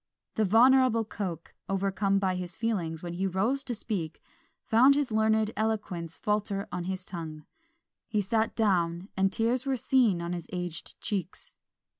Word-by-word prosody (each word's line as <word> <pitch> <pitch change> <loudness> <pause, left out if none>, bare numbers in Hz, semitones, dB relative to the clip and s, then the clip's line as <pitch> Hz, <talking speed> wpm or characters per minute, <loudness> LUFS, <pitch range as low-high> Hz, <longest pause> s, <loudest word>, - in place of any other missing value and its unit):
The 220 - +1
venerable 235 +2 +5
Coke, 180 -6 -5 0.2
overcome 195 +1 +1
by 190 -2 +1
his 180 -1 -5
feelings 175 -8 -2
when 175 -1 -4
he 190 +3 -1
rose 220 +10 0
to 245 -3 -2
speak, 180 -8 -4 0.5
found 255 +4 +6
his 285 -4 0
learned 220 0 +2
eloquence 205 -7 -2
falter 210 -1 -1
on 180 -1 -3
his 185 0 -3
tongue; 155 -4 -7 0.6
he 215 - 0
sat 220 +2 0
down, 180 -4 +1
and 195 0 +2
tears 230 +5 +1
were 265 -1 +1
seen 235 -8 +3
on 170 +1 -3
his 170 -2 -5
aged 180 -2 -5
cheeks. 195 -4 -3
195 Hz, 155 wpm, -29 LUFS, 180-225 Hz, 0.6 s, found